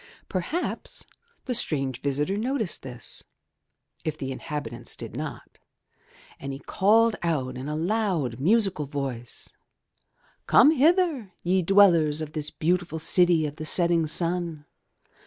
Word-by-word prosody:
Perhaps 210 Hz, -, -3 dB, 0.4 s
the 255 Hz, -, -1 dB
strange 135 Hz, -, +1 dB
visitor 145 Hz, +7 st, -1 dB
noticed 225 Hz, -2 st, -2 dB
this, 125 Hz, -2 st, -9 dB, 0.8 s
if 155 Hz, -1 st, -3 dB
the 135 Hz, -3 st, -4 dB
inhabitants 130 Hz, -4 st, -5 dB
did -, -, -6 dB
not, -, -, -7 dB, 0.8 s
and 140 Hz, -, -5 dB
he 135 Hz, -, -5 dB
called 215 Hz, +9 st, +3 dB
out, 135 Hz, -7 st, -1 dB
in 130 Hz, +3 st, -5 dB
a 150 Hz, -, -2 dB
loud, 170 Hz, -, -1 dB
musical 195 Hz, -, +2 dB
voice 135 Hz, -4 st, -5 dB, 0.5 s
— -, -, -39 dB
Come 290 Hz, -, +7 dB
hither, 310 Hz, -, +2 dB
ye 185 Hz, +2 st, +2 dB
dwellers 170 Hz, -5 st, +5 dB
of 155 Hz, -1 st, -5 dB
this 150 Hz, -1 st, -3 dB
beautiful 175 Hz, 0 st, -1 dB
city 170 Hz, 0 st, +3 dB
of 150 Hz, 0 st, -5 dB
the 155 Hz, -, -5 dB
setting 170 Hz, -1 st, +2 dB
Sim. 165 Hz, -1 st, -2 dB
165 Hz, 130 wpm, -26 LUFS, 145-195 Hz, 0.8 s, Come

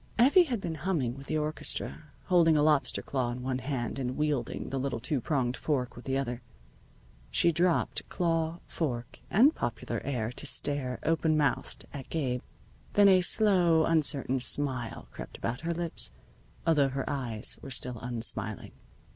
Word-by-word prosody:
Effie 285 Hz, +10 st, +6 dB
had 245 Hz, -7 st, -2 dB
been 170 Hz, -4 st, -4 dB
humming 155 Hz, -9 st, 0 dB
with 135 Hz, 0 st, -11 dB
the 155 Hz, -, 0 dB
orchestra, 155 Hz, 0 st, -2 dB, 0.2 s
holding 165 Hz, -3 st, +4 dB
a 145 Hz, -, +3 dB
lobster 150 Hz, -2 st, +2 dB
claw 130 Hz, -3 st, -1 dB
in 125 Hz, +1 st, -5 dB
one 130 Hz, 0 st, -1 dB
hand 130 Hz, -1 st, -3 dB
and 130 Hz, -1 st, -3 dB
wielding 150 Hz, -6 st, -1 dB
the 135 Hz, -, -1 dB
little 130 Hz, -3 st, -2 dB
two 130 Hz, +3 st, 0 dB
pronged 130 Hz, -2 st, 0 dB
fork 130 Hz, -5 st, -2 dB
with 120 Hz, -, -11 dB
the 135 Hz, 0 st, 0 dB
other. 125 Hz, -2 st, -3 dB, 0.9 s
She 170 Hz, -, +4 dB
dropped 170 Hz, +2 st, +1 dB
claw, 165 Hz, -1 st, -1 dB
fork, 120 Hz, -7 st, -4 dB
and 260 Hz, -, +5 dB
popular 120 Hz, -1 st, -3 dB
air 120 Hz, -5 st, -2 dB
to 145 Hz, -, -3 dB
stare 135 Hz, -3 st, +1 dB
open 160 Hz, -1 st, +2 dB
mouthed 145 Hz, -4 st, -1 dB
at 135 Hz, -3 st, -8 dB
Gabe. 130 Hz, -6 st, -1 dB, 0.5 s
Then 205 Hz, -1 st, +6 dB
a 185 Hz, -1 st, +6 dB
slow, 175 Hz, -5 st, +4 dB
uncertain 140 Hz, -5 st, +2 dB
smile 125 Hz, -, 0 dB
crept -, -, -9 dB
about 120 Hz, +2 st, -3 dB
her 165 Hz, +1 st, -2 dB
lips, 170 Hz, -, -3 dB, 0.5 s
although 150 Hz, -4 st, +4 dB
her 135 Hz, 0 st, -3 dB
eyes 120 Hz, -6 st, 0 dB
were -, -, -8 dB
still 125 Hz, -2 st, -3 dB
unsmiling. 110 Hz, -3 st, -4 dB
140 Hz, 165 wpm, -29 LUFS, 125-165 Hz, 0.9 s, Effie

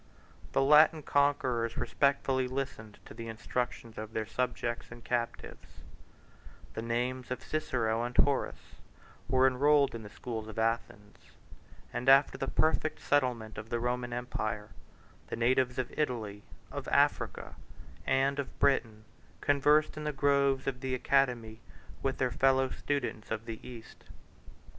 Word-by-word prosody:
The -, -, +3 dB
Latin 150 Hz, +2 st, +6 dB
conquerors 130 Hz, -6 st, +1 dB
respectfully 135 Hz, -2 st, +1 dB
listened 125 Hz, -5 st, -5 dB
to -, -, -11 dB
the 115 Hz, -, -7 dB
instructions 115 Hz, 0 st, -4 dB
of 110 Hz, 0 st, -7 dB
their 110 Hz, -, -1 dB
subjects 120 Hz, +1 st, -2 dB
and 115 Hz, 0 st, -11 dB
captives; 120 Hz, -1 st, -3 dB, 1.1 s
the -, -, -4 dB
names 120 Hz, +2 st, -2 dB
of 125 Hz, 0 st, -4 dB
Cicero 120 Hz, -7 st, -1 dB
and 120 Hz, 0 st, -5 dB
Horace 140 Hz, -1 st, +1 dB, 0.5 s
were 130 Hz, +1 st, +4 dB
enrolled 140 Hz, +2 st, +4 dB
in 115 Hz, -, -6 dB
the 105 Hz, -, -9 dB
schools 110 Hz, -1 st, -6 dB
of 110 Hz, -, -9 dB
Athens; 110 Hz, -4 st, -2 dB, 0.8 s
and 125 Hz, +2 st, 0 dB
after 135 Hz, +1 st, +6 dB
the 135 Hz, -, -3 dB
perfect 155 Hz, +1 st, +1 dB
settlement 125 Hz, -6 st, 0 dB
of 110 Hz, +1 st, -9 dB
the 120 Hz, -, -1 dB
Roman 120 Hz, 0 st, -2 dB
empire, 110 Hz, -4 st, -3 dB, 0.6 s
the -, -, -4 dB
natives 125 Hz, +2 st, +2 dB
of 130 Hz, -2 st, -3 dB
Italy, 110 Hz, -8 st, -2 dB, 0.3 s
of -, -, -6 dB
Africa, -, -, +1 dB, 0.5 s
and 135 Hz, +5 st, +1 dB
of 140 Hz, -, -5 dB
Britain, 115 Hz, -6 st, +1 dB, 0.4 s
conversed 150 Hz, +2 st, +3 dB
in 155 Hz, -, -5 dB
the 150 Hz, -, -1 dB
groves 140 Hz, -1 st, +2 dB
of 130 Hz, -2 st, -2 dB
the 130 Hz, -1 st, -1 dB
academy 125 Hz, -4 st, +1 dB, 0.4 s
with 135 Hz, -1 st, -1 dB
their 125 Hz, -1 st, 0 dB
fellow 130 Hz, +2 st, +3 dB
students 130 Hz, -6 st, -3 dB
of 110 Hz, 0 st, -3 dB
the 115 Hz, -1 st, -6 dB
East. 120 Hz, -3 st, -12 dB
125 Hz, 140 wpm, -31 LUFS, 115-135 Hz, 1.1 s, Latin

